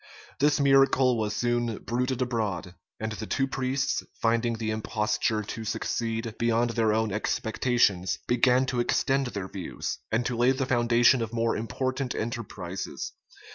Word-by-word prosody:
[*] - - -22
This 150 +2 +3
miracle 135 -2 +4
was 105 -2 -1
soon 120 -2 0
bruited 125 +2 -1
abroad; 105 -7 -2 0.3
and 110 0 -3
the 110 0 -5
two 135 - +1
priests, 130 0 -1 0.2
finding 115 0 +1
the 110 -1 -2
imposture 110 0 0
to 110 +2 -6
succeed 115 +1 -2
beyond 115 0 +2
their 115 -2 +2
own 110 0 +1
expectations, 105 -2 +1
began 125 +1 +3
to 125 -2 -2
extend 135 +2 +1
their 100 -6 -4
views, 95 -2 -5
and 115 +2 +1
to 125 - -1
lay 120 +3 +4
the 135 0 -1
foundation 120 -1 +4
of 115 0 -4
more 115 0 +1
important 130 +3 -2
enterprises. 110 - -5
115 Hz, 150 wpm, -27 LUFS, 110-125 Hz, 0.3 s, miracle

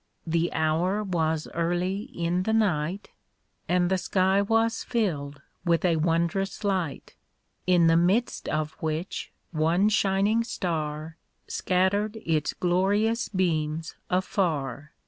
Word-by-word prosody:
The 170 +1 0
hour 170 +6 +1
was 160 -5 -1
early 175 +4 -1
in 175 -6 -1
the 220 +4 0
night. 190 -3 0 0.6
And 175 0 +2
the 190 - +2
sky 190 +2 +2
was 225 +2 +1
filled 145 - -2 0.2
with 170 0 +2
a 170 -2 +3
wondrous 170 +6 0
light, 185 -7 -2 0.5
In 175 -2 +5
the 165 0 +5
midst 190 +8 +1
of 155 0 -2
wffich 160 +3 -3 0.2
one 170 +5 +2
shining 205 +2 +2
star 160 -6 -3 0.3
Scattered 200 +4 0
its 155 -2 0
glorious 205 +6 +1
beams 160 -4 -1 0.2
afar. 155 - -1
175 Hz, 115 wpm, -26 LUFS, 160-195 Hz, 0.6 s, In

